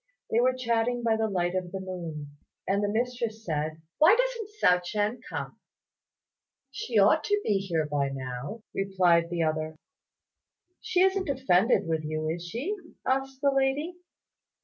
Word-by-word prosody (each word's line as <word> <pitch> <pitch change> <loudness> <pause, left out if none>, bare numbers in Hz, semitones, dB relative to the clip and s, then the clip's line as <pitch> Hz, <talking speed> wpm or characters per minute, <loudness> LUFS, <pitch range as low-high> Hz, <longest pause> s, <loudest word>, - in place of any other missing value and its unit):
They 225 - +3
were 255 +1 +3
chatting 240 -1 0
by 225 -1 +3
the 220 0 0
light 175 -2 0
of 185 -2 -2
the 195 - -4
moon; 165 -6 -6 0.3
and 200 +1 +1
the 205 - +1
mistress 230 0 -2
said, 155 0 -2 0.2
"Why 330 +8 +7
doesn't - - -1
Hsiao 180 - +4
ch'ien 210 +6 -1
come?" - - -5 1.1
"She 250 -4 -2
ought 210 +10 +5
to 415 0 +2
be 205 -2 +2
here 170 -5 -1
by 145 -2 0
now," 135 - -6
replied 180 -4 +2
the 170 -1 0
other. 155 0 -1 1.0
"She 360 - +1
isn't 380 -3 +2
offended 240 -6 +3
with 160 -1 -1
you; 155 0 -2
is 170 +1 -3
she?" 270 - -3 0.3
asked 270 0 -1
the 280 -1 +4
lady. 275 +5 0
205 Hz, 155 wpm, -28 LUFS, 170-260 Hz, 1.1 s, Why